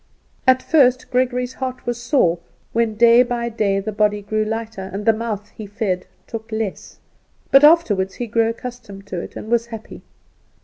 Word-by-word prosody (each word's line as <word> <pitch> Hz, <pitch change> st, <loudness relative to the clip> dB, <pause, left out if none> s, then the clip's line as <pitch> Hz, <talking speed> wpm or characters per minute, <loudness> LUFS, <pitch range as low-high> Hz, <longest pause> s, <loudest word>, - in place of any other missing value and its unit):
At 260 Hz, 0 st, +5 dB
first 255 Hz, -5 st, +3 dB
Gregory's 250 Hz, 0 st, 0 dB
heart 255 Hz, -1 st, -5 dB
was 240 Hz, 0 st, -3 dB
sore 180 Hz, -, +2 dB, 0.3 s
when 230 Hz, -1 st, +1 dB
day 235 Hz, +2 st, +6 dB
by 240 Hz, -1 st, -1 dB
day 205 Hz, -3 st, 0 dB
the 210 Hz, +2 st, -4 dB
body 210 Hz, 0 st, +1 dB
grew 215 Hz, +1 st, -1 dB
lighter, 220 Hz, -3 st, -5 dB
and 200 Hz, +2 st, -5 dB
the 225 Hz, -, +5 dB
mouth 215 Hz, -2 st, -4 dB
he 215 Hz, -, -9 dB
fed 200 Hz, -3 st, -2 dB, 0.2 s
took 225 Hz, 0 st, -8 dB
less; 220 Hz, -3 st, -4 dB, 0.5 s
but 275 Hz, +1 st, +7 dB
afterward 235 Hz, -, +5 dB
he 245 Hz, -, -4 dB
grew 225 Hz, 0 st, +1 dB
accustomed 230 Hz, -4 st, -8 dB
to 185 Hz, -3 st, -5 dB
it, -, -, -10 dB
and 220 Hz, -, -7 dB
was 235 Hz, 0 st, +2 dB
happy. 225 Hz, -1 st, -9 dB
225 Hz, 175 wpm, -20 LUFS, 210-245 Hz, 0.5 s, but